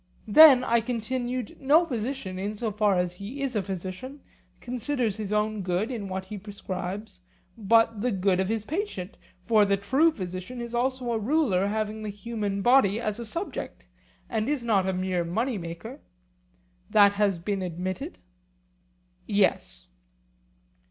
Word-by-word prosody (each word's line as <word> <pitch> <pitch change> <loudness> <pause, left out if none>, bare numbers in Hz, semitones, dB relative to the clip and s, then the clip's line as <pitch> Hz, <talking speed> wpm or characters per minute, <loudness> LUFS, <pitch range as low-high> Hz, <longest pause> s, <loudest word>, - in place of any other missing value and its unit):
Then, 265 +2 +9
I 235 -1 +2
continued, 245 +1 -3
no 300 +6 +5
physician, 235 - -4
in 205 +2 -3
so 225 0 -2
far 205 -2 +2
as 180 -1 0
he 210 +10 -6
is 260 -3 -2
a 210 - +2
physician, 190 +9 -6 0.4
considers 245 -3 -2
his 210 -2 -5
own 210 0 0
good 185 +6 -1
in 220 -5 -4
what 190 0 -4
he 205 +2 -7
prescribes, 200 0 -6 0.3
but 225 0 +3
the 250 - +1
good 190 -3 +1
of 190 0 0
his 220 -1 -1
patient; 270 - -4 0.3
for 220 -2 +5
the 200 -1 +2
true 265 +12 +3
physician 185 - -6
is 235 0 -6
also 250 0 -1
a 225 - 0
ruler 220 -6 +2
having 215 +1 -2
the 215 - -4
human 205 -1 -3
body 240 -5 +4
as 215 -1 -3
a 235 - -5
subject, 275 - -5 0.4
and 220 +3 -1
is 290 -4 -1
not 200 -5 +2
a - - 0
mere 185 -1 -1
money 220 +7 -1
maker; 170 - -7 0.9
that 205 -1 +6
has 200 -2 +1
been 195 +3 -2
admitted? 185 - -4 1.1
Yes. 190 - +1
215 Hz, 155 wpm, -27 LUFS, 190-245 Hz, 1.1 s, Then